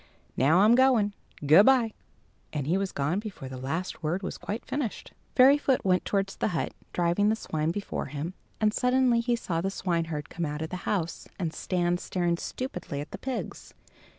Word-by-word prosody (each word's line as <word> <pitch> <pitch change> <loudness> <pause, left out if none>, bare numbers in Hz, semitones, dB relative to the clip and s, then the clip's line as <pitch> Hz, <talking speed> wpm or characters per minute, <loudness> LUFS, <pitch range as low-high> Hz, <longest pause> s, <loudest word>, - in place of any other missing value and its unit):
Now 155 +8 +4
I'm 215 +3 +6
going. 240 -5 +4 0.3
Good 160 - +7
bye!" 245 -5 +4 0.6
And 145 -3 -2
he 165 +5 +1
was 195 0 -1
gone 145 +7 0
before 205 -11 -7
the 130 - -7
last 160 +8 -3
word 170 +5 -1
was 185 - -5
quite 215 +4 -5
finished. 270 -7 -4 0.2
Fairyfoot 270 -1 +5
went 185 -1 +2
towards 195 -1 -1
the - - 0
hut, - - -2 0.2
driving 175 +4 +2
the 220 - +3
swine 155 -7 -2
before 200 +4 -3
him, 150 +5 -5 0.3
and 215 -1 +2
suddenly 250 -1 +3
he 240 +1 +1
saw 170 -7 -2
the 195 - 0
swineherd 165 -6 -2
come 170 - -5
out 150 0 -2
of 160 - -6
his 180 - -4
house, 170 -5 -2
and 170 -4 -2
stand 175 0 0
staring 175 -2 -1
stupidly 215 - -5
at 145 - -7
the - - -7
pigs. 265 -1 -5
185 Hz, 185 wpm, -28 LUFS, 160-220 Hz, 0.6 s, Good